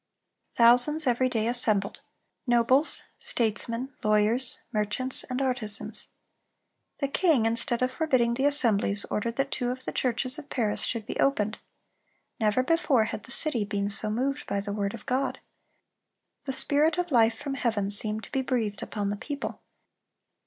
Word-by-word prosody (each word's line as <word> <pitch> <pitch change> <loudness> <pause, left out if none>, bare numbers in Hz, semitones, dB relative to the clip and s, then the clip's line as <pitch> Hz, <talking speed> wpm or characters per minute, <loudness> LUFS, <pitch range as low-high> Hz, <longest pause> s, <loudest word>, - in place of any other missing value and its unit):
Thousands 245 +7 +5
every 255 0 +2
day 225 -2 -1
assembled,—nobles, 240 +4 0 0.2
statesmen, 230 +3 -1
lawyers, 215 +4 +2
merchants, 215 +5 0
and 255 0 -4
artisans. 245 -6 -2 0.9
The 280 - -1
king, 280 -5 +2
instead 230 +2 0
of 255 - 0
forbidding 255 -7 +1
the 265 +3 0
assemblies, 215 -7 +3
ordered 230 +2 -2
that 275 +1 -1
two 245 - -2
of 255 +1 -5
the - - -3
churches 255 +2 -1
of 290 - -12
Paris 220 -5 -1
should 230 -3 -2
be - - -6
opened. 215 -6 +1 0.8
Never 220 +3 +2
before 290 -5 +2
had 220 -1 -5
the 260 - -7
city 265 -6 +3
been 200 0 -2
so 215 +1 -2
moved 265 +6 -2
by 200 - -1
the 200 0 -4
word 200 +1 -2
of 220 - -13
God. 265 +1 -1 1.1
The 270 - -2
spirit 300 +5 +2
of 355 -2 -2
life 230 -3 +4
from 280 - -5
heaven 220 -7 -1
seemed 215 +1 0
to - - -11
be 270 - 0
breathed 225 -6 -2
upon 205 -2 -3
the - - -2
people. 285 +7 -6
240 Hz, 155 wpm, -27 LUFS, 215-265 Hz, 1.1 s, Thousands